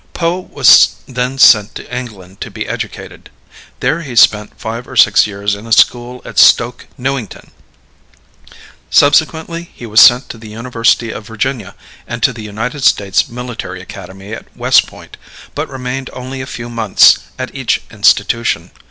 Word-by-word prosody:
Poe 170 +1 -1
was 185 - +4
then 125 +1 -3
sent 105 -5 +5
to 125 - -8
England 100 -7 -9
to - - -5
be - - -7
educated. - - -7 0.5
There 165 - 0
he 135 -7 -8
spent 105 -2 +3
five 115 +3 -6
or 130 - -11
six 105 -3 +5
years 100 0 -3
in 105 +3 -8
a - - -11
school 120 +2 +2
at - - -2
Stoke 120 +1 +3
Newington. 130 -4 -5 1.4
Subsequently 160 +3 +1
he 120 - -10
was 110 0 +4
sent 125 +3 +6
to 115 - -9
the 110 -1 -12
University 115 0 0
of 105 -1 -9
Virginia 115 -2 -4 0.3
and 120 0 -6
to 130 - +3
the 115 - -9
United 110 +6 -5
States 100 +1 +2
Military 120 -6 -7
Academy 95 +2 -11
at - - -9
West - - +3
Point, - - -14 0.4
but 150 +2 -4
remained 130 0 -5
only 130 +1 -7
a 130 - -7
few 120 -1 -7
months 115 -4 +4 0.2
at - - -6
each - - -2
institution. 115 0 +1
120 Hz, 160 wpm, -14 LUFS, 105-130 Hz, 1.4 s, sent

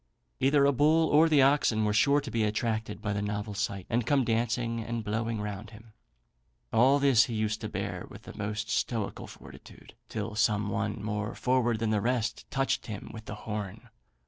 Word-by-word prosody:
Either 140 +1 +4
a 140 - +5
bull 155 +4 +3
or 155 +2 +5
the 145 -4 +5
oxen 135 -6 +3
were 105 - +1
sure 140 +7 +4
to 140 -4 -7
be 115 -1 +1
attracted 110 0 -2
by 105 - -1
the 100 - -2
novel 105 +1 -3
sight, 100 -3 -3
and 120 +1 0
come 140 -3 +3
dancing 115 0 -1
and 115 0 -4
blowing 110 +1 -2
round 105 0 -5
him. 110 0 -15 0.8
All 130 +5 +5
this 140 -3 +5
he 120 -4 -5
used 110 0 -1
to - - -4
bear - - -4
with - - -12
the - - -11
most 105 +1 -3
stoical 110 -1 -2
fortitude, - - -14 0.2
till 110 0 -4
some 105 -1 +1
one 105 +2 -2
more 105 0 -3
forward 125 -3 +1
than 110 0 -1
the 105 -2 +1
rest 120 -1 -1
touched 135 0 -1
him 105 -2 -7
with 110 -1 -9
the 105 - -6
horn. 105 +2 -5
110 Hz, 195 wpm, -29 LUFS, 105-125 Hz, 0.8 s, a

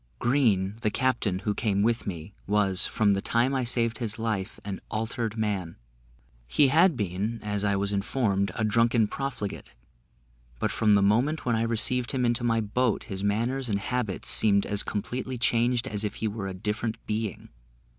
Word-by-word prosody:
Green, 110 - +1
the 110 - +1
captain, 115 -5 0
who 105 +2 -2
came 100 -3 0
with 115 +1 0
me, 90 0 -6
was, 100 -2 +2
from 105 -2 +2
the 100 - -1
time 120 +6 +1
I 130 -1 0
saved 115 -1 +1
his 110 -3 -1
life, 110 -3 -3
an 100 -2 -5
altered 115 0 -3
man. 100 -6 -2 0.7
He 135 - +4
had 165 +1 +4
been, 105 +3 -2
as 105 -1 -2
I 100 -1 +2
was 100 +1 0
informed, 100 -1 0
a 110 - -1
drunken 115 +1 +3
profligate; 125 -6 -5 0.8
but - - -1
from 105 -2 +3
the 100 - +3
moment 125 +10 +2
when 120 -2 +2
I 110 - 0
received 115 +2 +2
him 125 -2 +1
into 120 0 +1
my 115 -1 +2
boat, 110 +2 0
his 95 0 -6
manners 120 +5 0
and 100 - +1
habits 110 -1 -3
seemed 100 -2 +4
as 100 -1 0
completely 125 +5 -4
changed 120 +1 +1
as 105 -4 -1
if 105 - -3
he 110 - -2
were 105 -2 -4
a 95 - -5
different 110 +4 -2
being. 110 -2 -3
110 Hz, 180 wpm, -27 LUFS, 100-120 Hz, 0.8 s, He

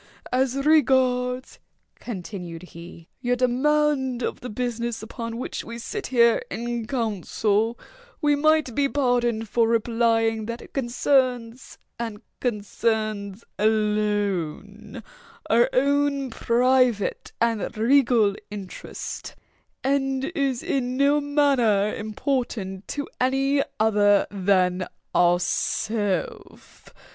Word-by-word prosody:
"As 260 0 +1
regards," 255 -4 +2 0.4
continued 180 -5 -7
he, 170 -1 -12
"your 245 -1 0
demand 265 0 +1
of - - -3
the 250 - -7
business 235 0 -3
upon 230 0 -6
which 250 - -4
we 230 0 -7
sit 400 - -5
here 235 -2 +4
in 235 -1 -4
council, 220 -1 0 0.4
we 295 -2 +3
might 310 -3 +2
be 280 +3 +1
pardoned 240 -5 +1
for 230 +2 +2
replying 225 -1 +1
that 235 0 -4
it - - -14
concerns, 250 -2 0 0.2
and 225 -3 -5 0.2
concerns 215 -2 -2 0.2
alone, 210 -1 -1 0.5
our 235 +2 +5
own 280 0 +1
private 245 -2 +1
and 230 -1 0
regal 230 -3 +3
interest, 200 -3 -7 0.5
and 270 -1 0
is 275 -6 -1
in 255 -1 -1
no 285 +2 +3
manner 265 -8 +2
important 215 -4 -3
to 285 -1 -4
any 270 +2 +2 0.2
other 205 -2 +4
than 185 -2 +1 0.3
ourself. 180 +3 -1
235 Hz, 100 wpm, -24 LUFS, 210-260 Hz, 0.5 s, our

